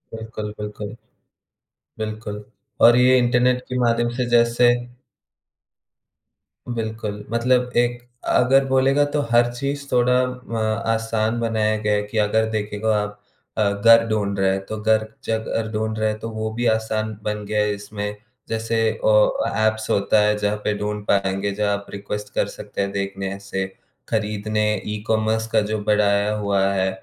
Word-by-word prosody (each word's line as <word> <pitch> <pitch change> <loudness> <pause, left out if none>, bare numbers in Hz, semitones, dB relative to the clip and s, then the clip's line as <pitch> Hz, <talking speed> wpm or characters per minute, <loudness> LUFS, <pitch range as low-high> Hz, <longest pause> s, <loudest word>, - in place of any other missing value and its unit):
बिल्कुल, 110 -1 -6
बिल्कुल। 105 +1 -6 1.0
बिल्कुल 110 -1 -5 0.4
और 120 - +6
ये 130 +1 +5
इंटरनेट 125 +1 +2
के 125 0 -2
माध्यम 120 0 +2
से 125 - +1
जैसे 120 +1 +4 1.9
बिल्कुल, 110 -3 -4
मतलब 125 +1 +2
एक 120 0 +1 0.3
अगर 135 +2 +4
बोलेगा 135 +2 +3
तो 150 - +2
हर 120 0 +4
चीज़ 140 +3 -3
थोड़ा 125 +1 +3
म 125 -2 -6 0.4
आसान 115 0 -1
बनाया 110 -2 +1
गया 105 -1 +1
है 105 - +2
कि 105 +2 -6
अगर 110 +1 +2
देखेगो 105 0 -2
आप 105 -1 -1 0.4
अ, 100 -2 +2
घर 115 +3 +6
ढूँढ 100 -2 -1
रहे 95 0 +3
हैं 95 0 -3
तो 110 - -5
घर 110 0 +2 0.2
ज 110 0 +1 0.2
घर 115 -1 -1
ढूँढ 110 0 -2
रहे 110 0 +2
हैं 105 - -4
तो 115 - -5
वो 110 0 -3
भी 120 +2 -2
आसान 110 -1 -2
बन 105 -1 -3
गया 105 +1 0
है 105 0 +1
इसमें। 105 0 -5 0.3
जैसे 115 0 -1 0.3
ओ - - +4 0.2
अ, - - -1 0.2
ऐप्स 110 0 -2
होता 100 +2 +3
है 105 0 +3
जहाँ 105 0 0
पे 105 - +1
ढूँढ 105 0 -3
पाएँगे, 100 0 +1
जहाँ 105 0 0
आप 100 - -11
रिक्वेस्ट 105 +1 -6
कर - - +1
सकते - - -6
हैं 100 - -1
देखने 100 0 -3
से, 95 -1 -3 0.4
खरीदने 110 -1 -1 0.3
ई-कॉमर्स 110 +1 0
का 110 - +4
जो 110 - 0
बढ़ाया 105 0 +2
हुआ 100 -2 +1
है, 95 0 +1
110 Hz, 160 wpm, -22 LUFS, 105-115 Hz, 1.9 s, और